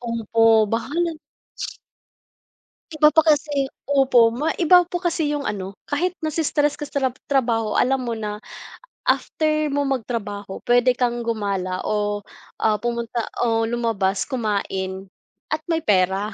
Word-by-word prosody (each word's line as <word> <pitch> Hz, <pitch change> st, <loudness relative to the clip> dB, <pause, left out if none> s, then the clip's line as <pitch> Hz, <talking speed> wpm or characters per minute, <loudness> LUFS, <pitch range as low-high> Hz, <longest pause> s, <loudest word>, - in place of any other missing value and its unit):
opo 225 Hz, -1 st, +3 dB
bahala 275 Hz, +8 st, -1 dB, 0.2 s
na -, -, -26 dB, 1.7 s
Iba 305 Hz, 0 st, +5 dB
pa 320 Hz, -, +6 dB
kasi 295 Hz, -3 st, +1 dB, 0.2 s
opo, 260 Hz, -5 st, +4 dB
ma 285 Hz, +7 st, -1 dB
iba 355 Hz, +1 st, +6 dB
po 355 Hz, -, -3 dB
kasi 340 Hz, -3 st, 0 dB
yung 285 Hz, -, -4 dB
ano, 195 Hz, -3 st, -4 dB
kahit 350 Hz, +5 st, -1 dB
nasi-stress 300 Hz, -2 st, +1 dB
ka 295 Hz, 0 st, -7 dB
sa -, -, -12 dB, 0.2 s
trab -, -, -26 dB
trabaho 230 Hz, -6 st, +1 dB
alam 265 Hz, +1 st, +2 dB
mo 235 Hz, -2 st, -3 dB
na 210 Hz, -1 st, -5 dB, 0.7 s
after 305 Hz, -1 st, +1 dB
mo 285 Hz, 0 st, 0 dB
magtrabaho 210 Hz, -6 st, -4 dB
puwede 245 Hz, +1 st, +5 dB
kang 240 Hz, -1 st, 0 dB
gumala 200 Hz, -5 st, -2 dB
o 205 Hz, -1 st, 0 dB, 0.4 s
ah, 215 Hz, -1 st, +2 dB
pumunta 235 Hz, -1 st, -2 dB, 0.2 s
o 225 Hz, -1 st, +2 dB
lumabas 225 Hz, -5 st, 0 dB
kumain 195 Hz, -6 st, -2 dB, 0.4 s
at 310 Hz, 0 st, -2 dB
may 330 Hz, -, +2 dB
pera. 195 Hz, -, +1 dB
235 Hz, 135 wpm, -22 LUFS, 210-290 Hz, 1.7 s, pa